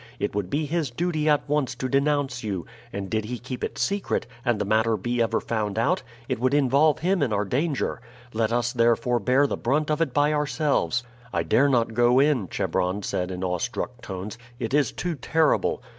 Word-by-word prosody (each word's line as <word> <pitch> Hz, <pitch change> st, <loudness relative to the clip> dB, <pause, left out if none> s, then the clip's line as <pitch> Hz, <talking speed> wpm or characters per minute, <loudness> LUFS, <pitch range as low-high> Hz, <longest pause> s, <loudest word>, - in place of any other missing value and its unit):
It -, -, -1 dB
would 100 Hz, -3 st, -2 dB
be 150 Hz, +6 st, 0 dB
his 155 Hz, -1 st, -1 dB
duty 155 Hz, +3 st, 0 dB
at 150 Hz, -1 st, +2 dB
once 145 Hz, -2 st, 0 dB
to 130 Hz, -, -3 dB
denounce 140 Hz, -2 st, +1 dB
you; 95 Hz, -5 st, -3 dB, 0.3 s
and 100 Hz, -1 st, -4 dB
did 110 Hz, +1 st, -1 dB
he 125 Hz, +3 st, -4 dB
keep 125 Hz, +1 st, -7 dB
it -, -, -3 dB
secret, 200 Hz, 0 st, -1 dB, 0.2 s
and 120 Hz, -2 st, +1 dB
the 105 Hz, -, -1 dB
matter 110 Hz, +2 st, +2 dB
be 120 Hz, +4 st, -1 dB
ever 115 Hz, -, +1 dB
found 110 Hz, -3 st, -2 dB
out, 115 Hz, -, +2 dB, 0.3 s
it -, -, -2 dB
would 130 Hz, +3 st, +2 dB
involve 145 Hz, +2 st, +4 dB
him 185 Hz, +2 st, +1 dB
in 135 Hz, -6 st, +1 dB
our 105 Hz, 0 st, +1 dB
danger. 140 Hz, -, -1 dB, 0.3 s
Let 110 Hz, 0 st, 0 dB
us 120 Hz, 0 st, 0 dB
therefore 120 Hz, 0 st, +2 dB
bear 130 Hz, +4 st, +3 dB
the -, -, -2 dB
brunt 150 Hz, +5 st, 0 dB
of 150 Hz, +2 st, 0 dB
it 160 Hz, -5 st, +1 dB
by 145 Hz, +3 st, +2 dB
ourselves." 150 Hz, -4 st, 0 dB, 0.3 s
"I -, -, 0 dB
dare 130 Hz, +6 st, +3 dB
not 115 Hz, -4 st, +2 dB
go 120 Hz, +2 st, +4 dB
in," 135 Hz, -8 st, +3 dB
Chebron 95 Hz, +3 st, -1 dB
said 90 Hz, -1 st, -2 dB
in 90 Hz, 0 st, -5 dB
awestruck 90 Hz, -1 st, -3 dB
tones. 95 Hz, +4 st, -6 dB, 0.2 s
"It 130 Hz, -, -4 dB
is 145 Hz, -5 st, +3 dB
too 175 Hz, -1 st, -3 dB
terrible." 155 Hz, -1 st, +1 dB
125 Hz, 205 wpm, -25 LUFS, 110-145 Hz, 0.3 s, involve